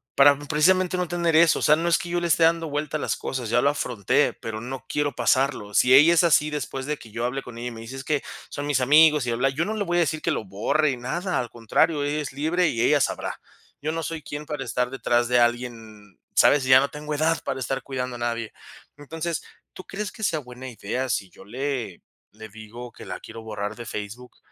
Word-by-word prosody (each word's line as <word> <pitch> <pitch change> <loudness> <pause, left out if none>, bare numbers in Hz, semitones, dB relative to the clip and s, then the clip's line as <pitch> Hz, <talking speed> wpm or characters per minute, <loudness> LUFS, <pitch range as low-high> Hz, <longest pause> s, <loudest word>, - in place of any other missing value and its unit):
para 140 0 +6
precisamente 180 +5 +2
no 180 -1 -1
tener 170 -2 +1
eso. 165 0 +5
O - - -6
sea, 150 - +5
no 170 +1 -1
es 170 - +4
que 175 - -6
yo 175 0 0
le 175 - -1
esté 165 0 +3
dando 165 -1 +2
vuelta 150 +1 -2
las - - -1
cosas, 125 -4 -4
ya 120 +1 +3
lo 140 - +4
afronté, 120 -8 +1
pero 110 -1 -6
no 130 +3 -6
quiero 145 -3 -1
pasarlo. 125 -4 +1
Si 125 +4 +5
ella 155 +5 +7
es 170 +1 +4
así 150 -2 +4
después 135 -2 -4
de 150 - -2
que 110 - -14
yo 115 +2 -4
hable 125 +3 -2
con 120 -3 -11
ella 120 - -5
y 125 - -4
me 115 - -9
dice: 115 +4 -8
"Es 135 - -7
que 150 -1 0 0.3
son 145 - -5
mis 145 -3 +1
amigos 150 +1 +5
y - - -2
bla-bla-bla, 130 +3 0
yo 160 - +1
no 215 +5 -3
le 205 - -1
voy 175 0 -1
a - - +4
decir 155 -1 -1
que - - 0
lo - - -2
borre 110 +10 0
y 130 - -4
nada, 175 +10 -2
al 120 -2 -3
contrario, 130 +7 +1
ella 145 +1 -1
es 140 - -6
libre 160 +5 +1
y 115 -7 -1
ella 145 +4 +4
sabrá. - - -2 0.4
Yo 155 +2 -2
no 165 0 -3
soy 160 +1 -4
quién 150 +1 -6
para 145 -2 -4
estar 125 +1 -1
detrás 120 -2 +1
de 125 0 +3
alguien, 115 -4 -3 0.2
¿sabes? 145 - +5
Ya 130 0 +7
no 140 - +1
tengo 150 +1 -6
edad 155 +2 +1
para 130 - -3
estar 135 +2 -3
cuidando 125 -2 -4
a 120 - -8
nadie. 115 -2 -3 0.4
Entonces, 160 +3 -4 0.3
¿tú 185 - -10
crees 205 +1 -5
que 220 0 -9
sea 165 -5 +1
buena 130 -1 -9
idea 125 +3 -4
si 100 -4 -1
yo 95 - -16
le 125 -4 -4 0.3
le 110 +1 -11
digo 110 +3 -10
que - - -12
la - - -6
quiero 115 0 -10
borrar 105 -1 -4
de 120 0 -8
Facebook 110 +5 -7
135 Hz, 245 wpm, -24 LUFS, 120-155 Hz, 0.4 s, ella